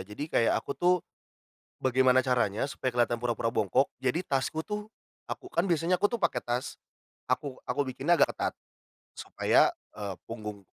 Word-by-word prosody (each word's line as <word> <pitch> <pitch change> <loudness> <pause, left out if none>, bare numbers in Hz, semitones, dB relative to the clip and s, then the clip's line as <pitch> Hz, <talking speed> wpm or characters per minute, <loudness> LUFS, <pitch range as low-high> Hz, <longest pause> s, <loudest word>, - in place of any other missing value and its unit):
jadi, 105 +9 -6
kayak 115 - +4
aku - - -3
tuh, 180 +1 +4 0.8
bagaimana 130 0 +4
caranya 120 -5 +1
supaya 130 -2 -2
kelihatan 120 -1 +1
pura-pura 120 -1 0
bongkok, 110 +6 +2 0.2
jadi, 145 +8 0
tasku 145 +3 -1
tuh, 210 0 -4 0.4
aku 370 - -6
kan 180 - +1
biasanya 170 +2 +2
aku 205 - +4
tuh - - -14
pakai 170 -5 +1
tas, 120 +1 -3 0.5
aku 140 -3 -1
aku 145 - 0
bikinnya 135 +6 +2
agak - - +4
ketat, - - -2 0.6
supaya, - - +3 0.2
eee, 100 -2 -4 0.2
punggung 105 -3 -6
130 Hz, 155 wpm, -29 LUFS, 115-165 Hz, 0.8 s, kayak